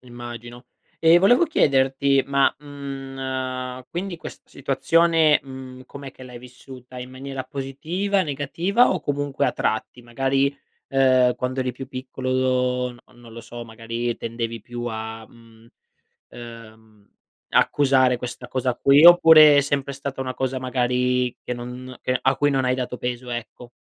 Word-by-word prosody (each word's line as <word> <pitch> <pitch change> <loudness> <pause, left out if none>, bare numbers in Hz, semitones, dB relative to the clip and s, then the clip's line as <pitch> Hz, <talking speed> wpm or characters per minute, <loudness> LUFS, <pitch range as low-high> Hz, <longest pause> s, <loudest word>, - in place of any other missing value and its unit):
Immagino. 120 0 -10 0.3
E 165 +1 +6
volevo 245 - +5
chiederti: 135 - +2
ma, 140 0 +3
mhmm, 135 -3 -6
quindi 180 +1 -4
questa - - -11
situazione, 165 -2 +2
mhmm, 130 -1 -10
com'è 140 0 -9
che 130 - -16
l'hai 125 -1 -10
vissuta? 125 0 -13
In 125 +1 -8
maniera 135 0 -7
positiva, 155 +10 -2
negativa 165 - +1
o 185 - -1
comunque 145 -1 -1
a - - 0
tratti? 110 +3 -3
Magari, 135 +3 0 0.3
ehm, 130 -2 +3
quando 130 +1 -3
eri 130 -1 -2
più 130 +2 -8
piccolo, 130 -1 -1
n 120 - -16 0.2
non 120 -1 -15
lo 115 - -9
so, 120 +1 -9
magari 115 +1 -4
tendevi 115 -1 -5
più 120 +2 -7
a, 110 -1 -6
mhmm, 115 0 -20 0.6
ehm, 110 -3 -13 0.4
accusare 130 -3 +3
questa 125 0 -7
cosa 130 -1 -1
qui, 140 +5 +5
oppure 160 -4 +8
è - - +5
sempre 140 0 -2
stata 140 0 -6
una 130 -1 -4
cosa 130 0 -2
magari 125 0 0
che - - -3
non 125 +1 -8
che 125 - 0
a 135 +1 +2
cui 145 - +2
non 135 -2 0
hai 125 - +2
dato 125 -1 -4
peso, 125 0 -5
ecco. 120 0 -7
130 Hz, 150 wpm, -23 LUFS, 120-140 Hz, 0.6 s, oppure